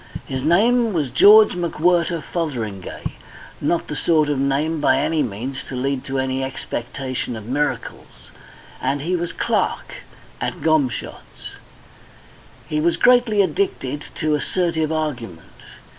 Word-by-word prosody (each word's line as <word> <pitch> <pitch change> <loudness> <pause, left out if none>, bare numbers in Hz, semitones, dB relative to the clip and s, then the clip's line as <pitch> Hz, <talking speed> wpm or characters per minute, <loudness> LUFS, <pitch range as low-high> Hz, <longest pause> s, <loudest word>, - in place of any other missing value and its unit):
His 130 -1 -4
name 220 - +3
was 150 -7 -1
George 210 - +7
McWhirter 170 -1 +1
Fotheringay 115 - -4 0.6
not 165 +4 0
the 150 - -4
sort 155 0 +2
of 145 -2 0
name 145 +4 0
by 130 -2 +4
any 160 +3 +1
means 125 +2 -4
to 135 - -7
lead 135 +1 -1
to 135 0 -3
any 130 0 -1
expectation 130 -1 -4
of 110 -2 -8
miracles 145 +5 -4 0.5
and 140 +2 -1
he 180 +3 0
was 175 -1 -2
clerk - - -1 0.4
at - - -3
Gomshott's. 155 -6 -1 1.2
He 150 0 -1
was 170 +2 +2
greatly 240 -5 +4
addicted 150 -5 -2
to 155 -1 0
assertive 160 0 0
argument. 125 - -3
150 Hz, 130 wpm, -21 LUFS, 130-170 Hz, 1.2 s, George